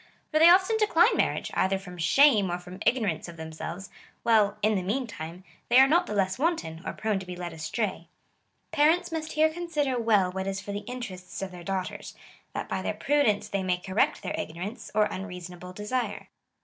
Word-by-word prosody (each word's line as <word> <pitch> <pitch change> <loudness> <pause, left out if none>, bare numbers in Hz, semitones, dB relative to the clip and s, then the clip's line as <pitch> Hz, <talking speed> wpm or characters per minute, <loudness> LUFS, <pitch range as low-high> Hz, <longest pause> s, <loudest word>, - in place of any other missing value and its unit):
For 310 - +3
they 330 +2 +9
often 375 +5 +5
decline 425 -1 +4
marriage, - - 0
either 190 +1 +2
from 180 -2 -10
shame 210 - +5
or 175 - -1
from 180 +1 -11
igno 250 -2 +3
rance 165 -4 -2
of 170 -1 -10
themselves, 160 +4 -7 0.3
while, 215 -3 +3
in 215 +1 +4
the 195 - 0
meantime, 185 -5 -4 0.3
they 240 - +5
are 265 +1 +8
not 340 +5 +3
the 210 - -3
less 190 +1 0
wanton, 270 - -1
or - - -4
prone 215 -3 -1
to 190 - -8
be 180 - -6
led 175 -1 -6
astray." 185 +6 -3 0.6
Parents 325 +3 +3
must 315 -1 -4
here 310 +1 +4
consider 300 -7 -1
well 210 -5 +3
what 190 +1 -4
is 195 0 -2
for 200 +1 -7
the 200 - -3
interests 195 -8 -6
of 190 - -5
their 175 -1 -10
daughters, 190 0 -4 0.4
that - - -4
by - - -2
their - - -2
prudence 280 -8 +2
they 200 - -2
may 185 -1 0
correct 190 +3 0
their - - -3
ignorance, 195 +7 -6
or 215 - +5
unreasonable 180 -3 -6
desire. 210 +3 -3
200 Hz, 200 wpm, -27 LUFS, 180-260 Hz, 0.6 s, they